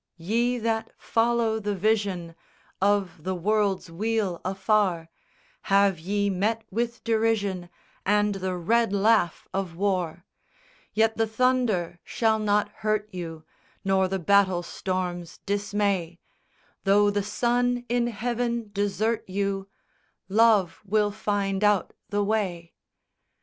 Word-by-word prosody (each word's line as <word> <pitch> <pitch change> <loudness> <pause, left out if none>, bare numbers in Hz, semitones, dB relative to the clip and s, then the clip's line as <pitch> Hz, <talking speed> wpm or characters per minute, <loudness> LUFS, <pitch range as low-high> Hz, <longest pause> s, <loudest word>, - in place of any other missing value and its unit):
SONG 165 - -14
I - - -8
_Ye 240 +1 +2
that 225 -1 -1
follow 230 -1 +1
the 205 -1 -2
vision 195 -4 0 0.5
Of 195 -5 +1
the 185 +1 -2
world's 195 -1 0
weal 205 -1 -1
afar, 190 -3 +1 0.6
Have 195 -3 +4
ye 200 +4 0
met 215 +4 0
with 235 +3 -2
derision 220 -5 0 0.3
And 210 +1 +2
the 190 -1 -3
red 225 +5 +2
laugh 200 -4 +2
of 190 -4 -3
war; 185 -3 -1 0.7
Yet 220 0 +2
the 225 0 +2
thunder 220 -7 +1
shall 220 -1 +1
not 210 -1 +1
hurt 215 -1 -1
you, 165 -3 -6 0.4
Nor 190 -1 +3
the 190 +1 -1
battle 190 0 +3
storms 175 -1 -4
dismay; 200 -4 -1 0.6
Tho' 205 +1 +4
the 205 0 0
sun 245 +4 0
in 240 0 +1
heaven 235 0 -2
desert 205 +2 0
you, 195 0 -2 0.6
"Love 200 -3 +3
will 210 +1 +1
find 205 -2 -1
out 210 -2 +2 0.2
the 205 0 0
way." 190 -6 -2
205 Hz, 125 wpm, -26 LUFS, 185-220 Hz, 0.7 s, Have